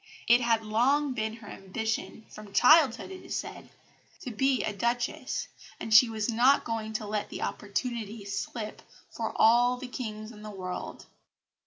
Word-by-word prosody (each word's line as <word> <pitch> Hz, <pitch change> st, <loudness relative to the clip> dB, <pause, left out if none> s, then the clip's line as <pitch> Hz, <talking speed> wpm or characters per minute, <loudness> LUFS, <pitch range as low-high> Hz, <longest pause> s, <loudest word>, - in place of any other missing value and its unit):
It 240 Hz, +1 st, +6 dB
had 230 Hz, -2 st, +1 dB
long 260 Hz, +6 st, +2 dB
been 220 Hz, -2 st, -2 dB
her 225 Hz, -2 st, -13 dB
ambition 220 Hz, +3 st, -4 dB
from 210 Hz, -2 st, -12 dB
childhood, 300 Hz, +2 st, +5 dB
it 375 Hz, -, -9 dB
is -, -, -5 dB
said -, -, -6 dB, 0.5 s
to 250 Hz, -, -6 dB
be 265 Hz, +3 st, +1 dB
a 210 Hz, -, -2 dB
Duchess, 235 Hz, +3 st, -2 dB, 0.3 s
and 220 Hz, -, -3 dB
she 230 Hz, +2 st, +8 dB
was 220 Hz, -2 st, -2 dB
not 245 Hz, +4 st, +4 dB
going 220 Hz, -1 st, -4 dB
to 215 Hz, 0 st, -3 dB
let 210 Hz, 0 st, -3 dB
the -, -, -5 dB
opportunity 220 Hz, 0 st, -4 dB
slip 210 Hz, +2 st, -5 dB, 0.3 s
for -, -, -3 dB
all 245 Hz, +2 st, +5 dB
the 260 Hz, 0 st, -7 dB
kings 215 Hz, -3 st, -6 dB
in 210 Hz, -2 st, -13 dB
the 215 Hz, -, -8 dB
world. 185 Hz, -3 st, -6 dB
225 Hz, 165 wpm, -28 LUFS, 215-245 Hz, 0.5 s, she